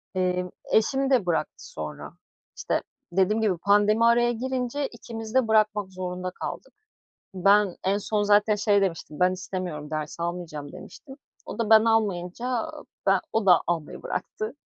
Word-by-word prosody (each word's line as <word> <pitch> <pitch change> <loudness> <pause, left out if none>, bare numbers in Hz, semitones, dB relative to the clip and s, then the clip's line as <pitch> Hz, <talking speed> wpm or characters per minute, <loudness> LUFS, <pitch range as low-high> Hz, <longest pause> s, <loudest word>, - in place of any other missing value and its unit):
Eee, 180 -1 0 0.2
eşim 270 +5 +2
de 250 -8 +3
bıraktı 160 -3 -2
sonra. 75 -1 -7 0.4
İşte, - - -1 0.3
dediğim 195 +5 +2
gibi 200 -5 +1
pandemi 205 +4 +3
araya 240 +1 +4
girince 255 +3 -2
ikimiz 225 -1 -8
de 260 -3 +4
bırakmak 215 -2 +2
zorunda 185 0 -4
kaldık. - - -7 0.6
Ben 195 0 +3
en 195 +2 +2
son 210 0 -1
zaten 205 +1 +4
şey 205 -1 +2
demiştim, 165 -5 -3
"Ben 180 0 +4
istemiyorum 185 -5 -5
ders 155 +1 -4
almayacağım. 170 -4 -5
"demiştim. 270 -3 -12 0.3
O - - -8
da 225 -2 0
ben 220 0 +7
almayınca, 225 - 0 0.3
ben 195 -1 +4
o 225 -2 +1
da 180 -2 +6
almayı 165 -3 -3
bıraktı. 435 -4 -4
205 Hz, 145 wpm, -26 LUFS, 180-225 Hz, 0.6 s, ben